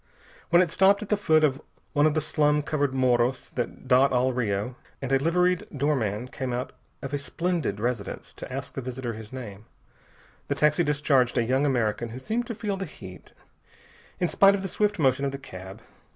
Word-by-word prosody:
When 175 +1 +6
it 170 - -4
stopped 195 +3 +4
at 210 - -10
the 210 - +3
foot 160 -6 +3
of 140 -1 +2 0.3
one 145 0 +4
of 155 - 0
the 155 - +2
slum 150 -1 +2
covered 145 -2 0
morros 125 -1 +1
that 120 +1 -4
dot 130 +2 +5
all 130 +1 +2
Rio, 115 0 -1 0.2
and 135 -1 -4
a 135 - +4
liveried 180 +4 +1
doorman 125 -6 0
came 130 -1 -4
out 125 +1 -3 0.3
of 135 +1 -5
a 145 - 0
splendid 165 - -2
residence 115 -2 -3
to - - -9
ask 135 +2 -5
the 135 - -4
visitor 125 -1 -4
his 110 0 -10
name, 110 -6 -8 0.8
the - - -1
taxi 150 +3 +3
discharged 145 -5 +2
a 120 - +3
young 130 +5 +1
American 120 -3 0
who 115 - -8
seemed 230 - -2
to 230 - -4
feel 205 -2 -3
the 195 - -3
heat, 90 - -12 0.9
in 180 - +2
spite 195 +3 +5
of 195 - -4
the - - -2
swift 210 +2 0
motion 135 -3 +2
of 140 - 0
the 140 - -5
cab. 95 -8 -10
135 Hz, 200 wpm, -26 LUFS, 125-155 Hz, 0.9 s, When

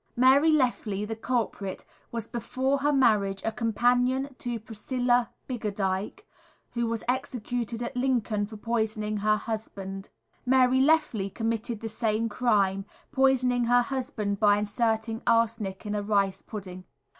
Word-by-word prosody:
Mary 270 +6 +5
Lefley, 235 -8 +1
the 225 - -3
culprit, 220 -5 -2 0.3
was 230 -1 -3
before 260 +4 -1
her 290 +2 +2
marriage 210 -8 +3
a 225 - +1
companion 245 +4 +2
of 245 -5 -6
Priscilla 245 +1 0 0.2
Biggadike, 210 - -2 0.5
who 235 -1 -1
was 230 -1 -2
executed 245 -2 -2
at 245 +3 -5
Lincoln 240 -5 0
for 215 0 -9
poisoning 215 -1 -1
her 215 +1 +2
husband. 195 -3 -6 0.3
Mary 260 0 +4
Lefley 275 -9 +2
committed 225 0 -2
the 225 - -3
same 225 0 -1
crime, 200 -4 +1 0.3
poisoning 255 -2 +3
her 245 +1 +4
husband 240 -7 -3
by 205 -1 +5
inserting 220 +1 -1
arsenic 225 -4 +1
in 210 - -3
a 210 - -1
rice 200 -2 +1
pudding. 185 -4 -8
230 Hz, 135 wpm, -27 LUFS, 210-250 Hz, 0.5 s, Mary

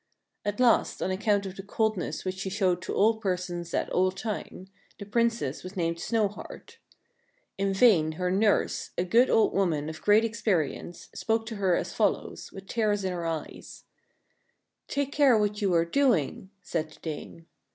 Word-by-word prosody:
At 205 +1 -3
last, 245 -2 +3
on 185 - -1
account 200 +1 +1
of 190 0 -7
the - - -5
coldness 215 -1 -2
which 185 0 -3
she 190 - -3
showed 185 -3 +1
to - - -4
all 220 +2 +3
persons 180 -4 -3
at - - 0
all 185 +1 +3
times, 190 -1 -6 0.3
the 200 - -8
Princess 230 - 0
was 185 +2 -9
named 170 -1 0
Snowheart. 225 - -3 0.8
In 195 0 +1
vain 190 -7 +4
her 180 +2 -1
nurse, 205 +2 +1
a 175 - +2
good 235 +8 +4
old 220 - +3
woman 160 -6 0
of 160 - -8
great 210 +2 +4
experience, 200 -7 -2
spoke 225 0 -1
to 225 -2 -6
her 190 -3 +2
as - - -3
follows, - - -1
with 195 0 -10
tears 210 -2 0
in 185 -1 -1
her 170 -1 -3
eyes: 160 -2 -6 0.5
— - - -45 0.3
"Take 280 -1 -2
care 280 -6 +5
what 210 0 0
you 195 -2 +2
are 165 0 +3
doing," 190 - +1
said 160 -3 -2
the - - -17
dame. 160 +1 -7
195 Hz, 175 wpm, -28 LUFS, 175-220 Hz, 0.8 s, care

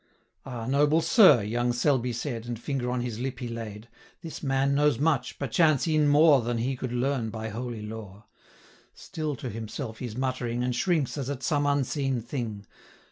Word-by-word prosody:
'Ah! 120 -3 -5
noble 145 +5 +3
sir,' 165 - +6
young 120 +4 0
Selby 125 0 +1
said, 120 -1 -4
And 120 -2 -4
finger 125 0 -2
on 125 0 -1
his 120 -2 -4
lip 130 0 -3
he 125 - -5
laid, 115 -2 -7 0.4
'This 165 - -7
man 135 0 +1
knows 145 -2 +3
much, 145 -3 0
perchance 155 +1 +2
e'en 155 -2 +3
more 145 -1 +6
Than 120 +1 -2
he 130 +4 -1
could 125 -1 -5
learn 125 -1 0
by 110 0 -5
holy 115 0 -5
lore. 105 -2 -8 0.7
Still 155 -2 -4
to 125 - -6
himself 110 +1 -6
he's 120 -4 -5
muttering, 130 -2 -2
440 - - 0
And 125 -1 -1
shrinks 155 -1 0
as 135 -1 -3
at 140 -2 -4
some 145 -2 +1
unseen 140 -2 0
thing. 115 -4 -5
125 Hz, 185 wpm, -27 LUFS, 115-145 Hz, 0.7 s, sir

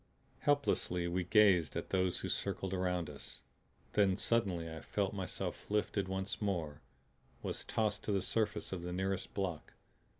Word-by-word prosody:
Helplessly 135 -11 +2
we 90 +1 0
gazed 95 -4 +5
at - - -4
those 95 -1 +1
who - - -2
circled 95 -1 -2
around 90 -2 0
us. 70 -4 -9 0.5
Then 100 -3 +4
suddenly 100 -8 +1
I 80 0 -6
felt 100 -2 -1
myself 95 -2 -4
lifted 105 -2 +1
once 95 +2 -2
more, 85 -8 -1 0.6
was - - -1
tossed 105 -2 0
to - - 0
the 100 -2 +2
surface 105 -3 0
of 90 - -3
the 90 0 -4
nearest 95 +1 -2
block. 90 -6 -3
95 Hz, 155 wpm, -35 LUFS, 90-105 Hz, 0.6 s, gazed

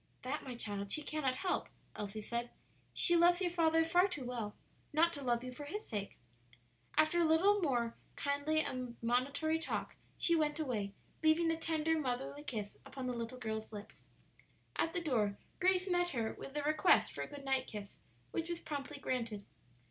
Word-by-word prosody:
"That, 265 +4 -2
my 255 -2 -6
child, 200 -3 -3
she 305 - +2
cannot 285 -4 0
help," 365 +7 -1 0.3
Elsie 210 +1 -4
said; 235 +2 -2 0.4
"she 345 - +4
loves 345 +1 +6
your 360 -2 +1
father 325 -1 +4
far 355 +3 +5
too 295 -9 -5
well 230 -4 -3 0.4
not 330 +2 +4
to 285 - -4
love 240 -2 +1
you 255 - -5
for 290 +4 -7
his 415 +9 -4
sake." 205 -3 -4 0.8
After 310 +3 +4
a - - +5
little 370 +6 +5
more 240 -7 +1 0.2
kindly 285 +2 +1
admonitory 255 +5 0
talk - - -3 0.2
she 340 - +4
went 305 -1 +1
away, 215 -9 -2 0.3
leaving 325 +1 +4
a - - +1
tender, 320 0 +1
motherly 270 +1 -2
kiss 215 -8 -4
upon 265 -2 -6
the 250 - -1
little 235 +1 -4
girl's 220 -2 -4
lips. 210 -1 -10 0.7
At 330 - +1
the 350 - +2
door 215 -9 +1 0.2
Grace 370 0 +3
met 355 -1 +2
her 230 -7 -1
with 275 +2 -7
a 295 - 0
request 305 +1 +4
for - - -5
a - - -2
good 285 -1 -9
night 265 -1 +1
kiss, 205 -2 -7 0.3
which 335 0 -2
was 345 -1 -2
promptly 285 -1 -5
granted. 230 -7 -2
285 Hz, 180 wpm, -36 LUFS, 240-325 Hz, 0.8 s, loves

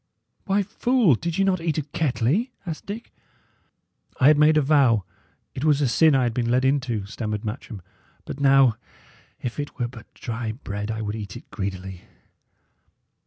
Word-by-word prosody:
"Why, 200 0 +2
fool, 225 - +2
did 165 +7 -2
ye 195 - +3
not 190 -3 +1
eat 165 -2 -1
at 145 -1 -4
Kettley?" 155 - 0 0.2
asked 165 -3 -6
Dick. 215 +4 -7 1.1
"I 130 - +7
had 150 - +5
made 155 +1 +5
a - - +5
vow 135 -8 +4 0.5
it 135 - -5
was 150 -2 +3
a 145 - +2
sin 155 +4 +4
I 130 - +3
had 120 -2 0
been 120 0 -1
led 125 +2 +2
into," 130 -7 0
stammered 105 +1 -4
Matcham; 105 -3 -6 0.4
"but - - -7
now, 135 -4 +5 0.7
if 125 +3 -4
it 145 - -5
were 120 -3 -1
but 115 -2 -13
dry 115 -2 -4
bread, 105 -3 -5
I 110 0 -3
would 105 0 -3
eat 105 -3 -6
it - - -15
greedily." 95 -2 -5
130 Hz, 175 wpm, -24 LUFS, 110-155 Hz, 1.1 s, I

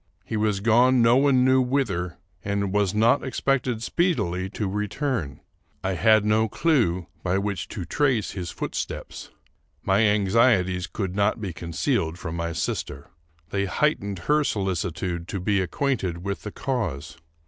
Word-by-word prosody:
He - - -4
was 105 -2 0
gone 120 +3 +4
no 115 +1 +5
one 135 -2 +4
knew 130 0 +5
whither, 125 - -1 0.3
and 100 -1 -1
was 105 -1 +1
not 115 +5 +3
expected 130 -3 -1
speedily 95 - 0
to 105 +1 -3
return. 105 - -2 0.4
I 95 - 0
had 110 +5 +4
no 110 +1 +2
clew 110 - +1 0.2
by 90 +1 0
which 100 -3 -2
to 95 - -6
trace 130 - +1
his 90 -4 -5
footsteps. - - -5 0.5
My 95 +1 +2
anxieties 100 -3 +2
could 95 -3 -4
not 100 +2 +1
be 100 -5 -4
concealed 85 - -1
from 85 -3 -5
my 85 0 -2
sister. 70 -3 -4 0.4
They 100 0 0
heightened 100 -3 0
her 150 0 +3
solicitude 90 - -2
to 100 - -4
be 100 +1 +1
acquainted 95 -5 -2
with 100 0 -3
the 105 - -6
cause. 85 - -3
100 Hz, 150 wpm, -25 LUFS, 90-120 Hz, 0.5 s, no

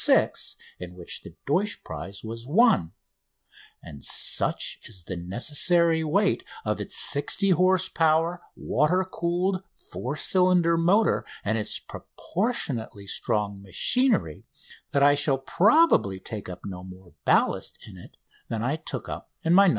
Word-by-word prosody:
6," - - +2 0.2
in 90 0 -8
which 90 -2 -7
the - - -13
Deutsch 200 +9 0
prize 90 +6 -8
was 115 +2 -7
won; 155 - +4 0.9
and 70 -1 -11
such - - -2
is 95 -6 -10
the 95 - -5
necessary 160 - +1
weight 195 +7 +1 0.2
of - - -1
its - - -2
60 185 +7 +3
horse 185 +1 +3
power, 165 +2 +1
water 175 +7 +1
cooled, 180 +1 -1 0.3
four 130 +4 -4
cylinder 180 0 +3
motor 185 +7 +3 0.2
and 110 +2 +1
its 105 - -2
proportionally 140 - -4
strong 100 -1 -2
machinery 100 - +1 0.5
that 140 - +2
I 145 0 +7
shall 145 -1 +1
probably 170 - +3
take 105 -1 -7
up 90 -1 -8
no 90 -2 -7
more 95 -1 -13
ballast - - +1
in - - -11
it - - -14 0.3
than 115 -1 -2
I 135 +6 0
took 160 - -5
up - - -7
in 165 0 +3
the 200 +1 +7
"No. - - +6
145 Hz, 145 wpm, -26 LUFS, -, 0.9 s, I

